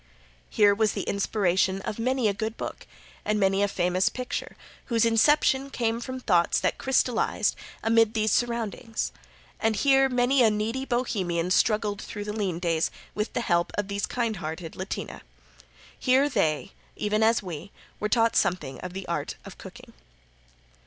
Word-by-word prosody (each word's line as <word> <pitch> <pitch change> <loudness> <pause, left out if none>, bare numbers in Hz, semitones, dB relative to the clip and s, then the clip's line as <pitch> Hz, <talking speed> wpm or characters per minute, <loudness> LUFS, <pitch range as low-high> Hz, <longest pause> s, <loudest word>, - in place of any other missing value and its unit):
Here 205 -1 +5
was 215 0 +1
the - - -3
inspiration 190 -2 +1
of 210 - -5
many 255 0 +1
a 205 - +2
good 220 +2 -4
book - - -6 0.4
and 210 0 0
many 195 0 +2
a 205 - +3
famous 180 -1 +1
picture 250 -1 -5 0.3
whose 230 -2 +2
inception 270 +4 +3
came 230 -3 -1
from 260 +2 -5
thoughts 175 -8 +2
that - - -1
crystallized 255 -2 +1 0.3
amid 225 0 +3
these 215 -1 +1
surroundings, 230 -1 -1 0.5
and 220 0 +1
here 270 +3 +4
many 250 +1 +3
a 230 - +6
needy 220 +5 -2
Bohemian 190 -9 -1
struggled 210 0 +2
through 205 - -6
the 210 0 -4
lean 195 -6 -2
days 165 -2 0 0.2
with 210 +1 -3
the - - -1
help 175 -6 +1
of 205 -1 -1
these 200 +1 -1
kind 230 -4 -1
hearted 160 0 -6
Latina. 185 +1 -5 0.8
Here 260 +3 +4
they, 155 - 0 0.2
even 210 +1 0
as 225 0 +3
we, 175 +1 -7 0.3
were 210 - -1
taught 230 -1 +3
something 150 -8 0
of 180 -1 -7
the 190 0 -6
art 170 - -3
of - - -11
cooking. - - -12
215 Hz, 160 wpm, -26 LUFS, 190-235 Hz, 0.8 s, a